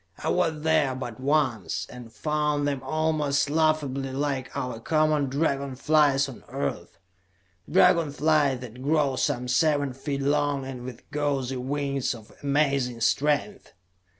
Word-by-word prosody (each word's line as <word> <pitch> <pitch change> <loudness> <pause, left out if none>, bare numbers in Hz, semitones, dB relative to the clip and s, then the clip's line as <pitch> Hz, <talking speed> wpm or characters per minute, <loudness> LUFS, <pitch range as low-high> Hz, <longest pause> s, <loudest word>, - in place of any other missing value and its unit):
I - - -3
was 165 -4 0
there 155 -5 +2
but 120 -3 -6
once, 130 - 0
and 120 -2 -11
found 150 +5 0
them 140 -2 -2
almost 145 0 0
laughably 150 -4 +1
like 135 -1 -2
our 125 -4 -3
common 155 +1 +2
dragon 140 -1 -1
flies 140 -1 +3
on 135 - -10
Earth; 70 - -4 0.7
dragon 170 -4 +4
flies 145 -3 +2
that 125 0 -9
grow 145 -1 +2
some 125 0 -1
seven 145 +1 +2
feet 140 +1 -4
long, 145 -1 +1
and 130 -2 -6
with 125 -1 -9
gauzy 140 -3 -1
wings 140 0 -2
of 110 -2 -14
amazing 140 -4 +1
strength. 150 - 0
140 Hz, 135 wpm, -26 LUFS, 130-150 Hz, 0.7 s, dragon